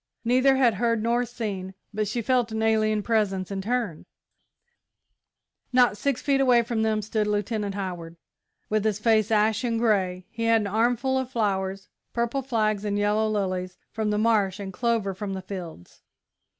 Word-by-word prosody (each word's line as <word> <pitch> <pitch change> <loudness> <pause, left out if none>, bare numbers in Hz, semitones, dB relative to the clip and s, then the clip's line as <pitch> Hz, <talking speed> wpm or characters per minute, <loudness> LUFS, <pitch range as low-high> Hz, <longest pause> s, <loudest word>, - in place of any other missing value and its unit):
Neither 255 +3 +4
had 255 -4 +4
heard 230 +1 0
nor 240 +2 +1
seen, 200 -6 -5 0.2
but 215 0 -1
she 230 +3 -2
felt 245 -1 +1
an 220 0 -2
alien 215 -1 +2
presence, 200 -4 0
and 195 -1 -3
turned. 225 -6 -2 1.6
Not 250 -3 +4
six 260 +4 -1
feet 275 -1 +2
away 245 -3 +5
from 230 -1 -2
them 215 -1 +1
stood 215 0 -1
Lieutenant 210 -1 -1
Howard, 175 -4 -5 0.5
with 215 -1 0
his 215 -2 +1
face 220 -1 +2
ashen 220 +2 +2
grey. 190 -5 +1
He 230 0 -3
had 230 -1 +4
an - - -3
armful 240 +5 +1
of 260 -1 -4
flowers 195 -5 -1 0.3
purple 235 +3 -1
flags 215 -5 0
and 205 -1 -1
yellow 210 +1 +1
lilies 185 -3 -2
from 220 -1 -2
the 210 - 0
marsh 210 -3 +2
and 195 -1 -6
clover 230 -3 0
from 195 +1 -5
the 190 - -5
fields. 175 - -9
215 Hz, 165 wpm, -25 LUFS, 200-235 Hz, 1.6 s, away